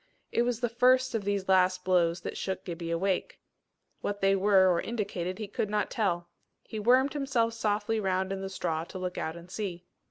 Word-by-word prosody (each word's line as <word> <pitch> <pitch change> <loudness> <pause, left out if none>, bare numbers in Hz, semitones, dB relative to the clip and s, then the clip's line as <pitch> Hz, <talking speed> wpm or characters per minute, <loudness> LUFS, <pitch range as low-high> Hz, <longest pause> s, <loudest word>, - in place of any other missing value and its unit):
It - - +2
was 240 -1 0
the 240 - +2
first 255 +2 +3
of 220 -3 -2
these 200 -1 -1
last 185 -1 +3
blows 175 -1 +2
that - - -5
shook 190 -1 -4
Gibbie 170 -1 -5
awake. 180 +3 -1 0.6
What 205 0 -3
they 195 0 +3
were 195 -1 +5
or 170 - 0
indicated 195 -5 -3
he 215 -2 -5
could 205 +1 -2
not 210 -1 0
tell. 175 -6 0 0.4
He 220 - -6
wormed 255 +5 +4
himself 265 -6 0
softly 215 0 0
round 190 -1 0
in 195 - -4
the 195 - -4
straw 165 -4 -2
to 185 - -8
look 180 -1 -4
out 160 - -3
and 170 +1 -12
see. 185 -4 -4
195 Hz, 200 wpm, -29 LUFS, 180-225 Hz, 0.6 s, were